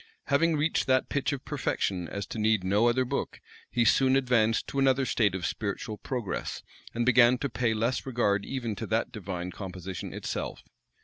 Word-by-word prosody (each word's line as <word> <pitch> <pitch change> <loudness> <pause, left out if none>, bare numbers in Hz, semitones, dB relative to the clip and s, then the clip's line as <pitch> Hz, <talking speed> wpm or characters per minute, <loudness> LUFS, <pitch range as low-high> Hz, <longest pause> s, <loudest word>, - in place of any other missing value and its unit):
Having 160 +3 +3
reached 155 -1 +1
that 130 -1 +2
pitch 140 - 0
of 140 -2 -5
perfection 100 - -1
as 100 +2 -4
to 110 - -6
need 110 -2 +2
no 100 +5 +3
other 130 +2 +2
book, - - -3 0.3
he 120 -1 +1
soon 130 +3 +4
advanced 120 -4 +2
to 140 - -3
another 135 0 +3
state 105 -5 +2
of 90 -3 -3
spiritual 105 +3 -3
progress, 120 -7 -4 0.3
and 120 0 0
began 125 0 +6
to 140 +2 -2
pay 115 0 0
less 115 +4 0
regard 105 -6 +1
even 120 -4 -3
to - - -4
that 110 +1 0
divine 90 -3 -5
composition 95 -1 -6
itself. - - -4
115 Hz, 180 wpm, -28 LUFS, 100-130 Hz, 0.3 s, began